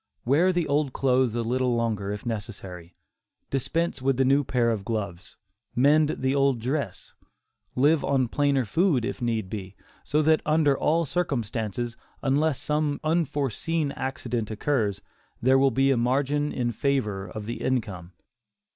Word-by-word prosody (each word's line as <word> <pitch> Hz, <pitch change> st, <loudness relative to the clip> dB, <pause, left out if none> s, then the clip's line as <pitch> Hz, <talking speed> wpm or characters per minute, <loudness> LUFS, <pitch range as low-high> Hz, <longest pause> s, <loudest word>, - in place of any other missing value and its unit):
Wear 155 Hz, +9 st, +4 dB
the 175 Hz, -3 st, 0 dB
old 145 Hz, -1 st, 0 dB
clothes 130 Hz, -3 st, +2 dB
a 120 Hz, -, 0 dB
little 125 Hz, +1 st, 0 dB
longer 110 Hz, -4 st, -1 dB
if 105 Hz, +2 st, -6 dB
necessary; 100 Hz, -6 st, -6 dB, 0.6 s
dispense 145 Hz, +2 st, -1 dB
with 135 Hz, -1 st, +1 dB
the 135 Hz, -, +3 dB
new 140 Hz, +2 st, +4 dB
pair 120 Hz, -3 st, +1 dB
of 105 Hz, -3 st, -2 dB
gloves; 100 Hz, -4 st, -5 dB, 0.4 s
mend 145 Hz, +4 st, +4 dB
the 130 Hz, +1 st, 0 dB
old 140 Hz, -3 st, +2 dB
dress; 125 Hz, -4 st, -3 dB, 0.6 s
live 145 Hz, +4 st, +3 dB
on 130 Hz, -3 st, +1 dB
plainer 140 Hz, 0 st, +1 dB
food 145 Hz, -, +2 dB
if 125 Hz, -, -4 dB
need 115 Hz, -4 st, -1 dB
be; 95 Hz, -1 st, -7 dB, 0.3 s
so 150 Hz, +2 st, +1 dB
that 155 Hz, +1 st, +4 dB
under 150 Hz, -2 st, +3 dB
all 165 Hz, +4 st, +1 dB
circumstances, 120 Hz, -, -2 dB, 0.3 s
unless 140 Hz, +1 st, +1 dB
some 150 Hz, -1 st, -1 dB
unforeseen 155 Hz, -1 st, 0 dB
accident 125 Hz, -5 st, -3 dB
occurs, 110 Hz, -2 st, -1 dB, 0.4 s
there 130 Hz, +2 st, +4 dB
will 135 Hz, 0 st, +5 dB
be 135 Hz, +2 st, +2 dB
a 130 Hz, -, +2 dB
margin 140 Hz, +4 st, +1 dB
in 120 Hz, -2 st, -1 dB
favor 105 Hz, -7 st, -1 dB
of 105 Hz, +3 st, -7 dB
the 115 Hz, -, -5 dB
income. 100 Hz, -9 st, -2 dB
130 Hz, 150 wpm, -26 LUFS, 115-145 Hz, 0.6 s, will